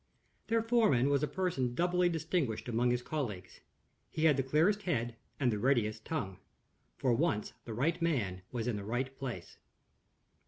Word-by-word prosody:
Their 230 0 +2
foreman 220 - +3
was 140 -1 +3
a 150 - +1
person 140 -11 -1
doubly 180 +3 +2
distinguished 160 -9 -1
among 120 +1 +2
his 120 0 0
colleagues. 105 -13 -4 0.5
He 155 - -3
had 150 -3 +6
the 135 - +1
clearest 160 +10 +2
head, 120 - -1 0.2
and 130 -4 +3
the 105 - -2
readiest 110 -3 +1
tongue. 95 - -3 0.6
For 130 -3 +2
once 115 -5 0
the 115 - -5
right 155 +9 0
man 110 - 0
was 120 -3 -2
in 120 -4 -1
the 100 - -5
right 125 +5 -2
place. 135 -3 -6
130 Hz, 165 wpm, -33 LUFS, 115-165 Hz, 0.6 s, had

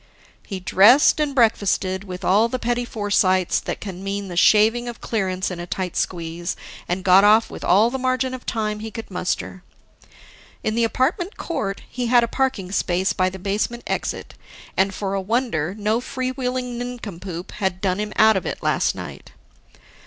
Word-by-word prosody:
He 195 -3 -5
dressed 215 +12 +5
and 295 -2 0
breakfasted 200 -5 +1
with 180 -2 -7
all 210 +5 +4
the 255 - -2
petty 245 0 -1
foresights 200 -5 +1
that - - -5
can 190 -2 -7
mean 200 0 -3
the 175 - -6
shaving 220 +6 +4
of 240 - -6
clearance 190 -4 -2
in 180 - -6
a 175 - -6
tight 180 -1 -3
squeeze, 170 0 -3 0.3
and 180 +2 -2
got 190 0 +6
off 215 +2 +5
with - - -8
all 210 +6 +4
the 265 - -3
margin 255 0 0
of 255 - -7
time 215 -2 -2
he 220 +1 -6
could 225 -1 -8
muster. 180 0 -3 1.0
In 215 - 0
the 230 +1 +2
apartment 315 - -1
court, 200 - -3
he 245 0 -3
had 240 0 +5
a - - 0
parking 230 -8 -1
space 185 -1 0
by 185 -1 +1
the 190 - -8
basement 205 +5 -2
exit - - -3 0.4
and, 195 +1 +2
for 195 0 -3
a 195 - -1
wonder, 200 - -1
no 215 +3 0
free 255 0 -3
wheeling 250 -2 -3
nincompoop 195 -8 -6
had 190 -2 -2
done 185 0 0
him 210 0 -3
out 220 0 +6
of 190 - -2
it - - -5
last - - +1
night. - - -9
210 Hz, 180 wpm, -22 LUFS, 185-240 Hz, 1.0 s, got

